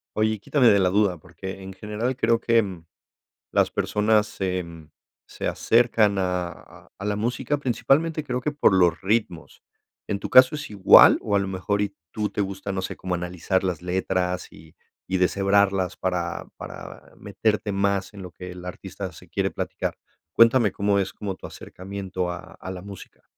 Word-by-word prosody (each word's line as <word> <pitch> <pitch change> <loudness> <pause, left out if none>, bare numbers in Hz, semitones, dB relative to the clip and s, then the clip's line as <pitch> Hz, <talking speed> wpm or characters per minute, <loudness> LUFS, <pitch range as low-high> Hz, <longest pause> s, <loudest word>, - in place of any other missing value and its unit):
Oye, 110 -1 +1
quítame 125 +3 +2
de 100 - +5
la 90 -1 +3
duda, 100 -2 +2
porque 95 +3 -9
en 95 0 -8
general 105 +6 -3
creo, 115 -2 +2
mm, - - -15
que 115 -2 +3 0.9
las - - +2
personas 105 0 +2
se, 95 -1 -2
mm, 80 -2 -12 0.4
se - - -6
acercan 115 -3 +3
a 90 -2 -4
a 100 - -7
la 105 0 -1
música, 120 +6 -1
principalmente 150 +4 +1
creo 125 -3 -2
que 145 +4 -2
por 140 -9 +3
los 90 -3 +3
ritmos, 95 -4 -2 0.4
¿en 100 - -2
tu - - -5
caso 130 +3 +7
es 150 -1 -5
igual? 100 -2 +7
O, 100 - -1
a - - +5
lo 95 -1 -2
mejor, 95 +2 -1
y 100 -1 -2 0.2
tú 105 -1 -2
te - - -4
gusta, 100 0 -5
no 95 -1 -2
sé, - - -5
cómo 90 -1 -3
analizar 90 +2 -1
las 90 -2 -2
letras, 90 0 -1
y 80 0 -16 0.3
y 95 0 -1
deshebrarlas 95 0 +2
para 90 -2 -2
para - - -10
meterte 105 +1 -1
más 100 0 0
en 100 - -9
lo 90 - -8
que 90 0 -9
el 90 0 -10
artista 90 - -7
se - - -15
quiere - - -1
platicar. - - -4 0.4
Cuéntame, 115 -3 +5
¿cómo 100 0 +1
es 95 -1 -1
como 100 -3 -5
tu - - -9
acercamiento 95 -1 -6
a 90 +1 -8
a 95 - -6
la 90 -1 -7
música? 100 -1 -12
100 Hz, 180 wpm, -24 LUFS, 90-110 Hz, 0.9 s, caso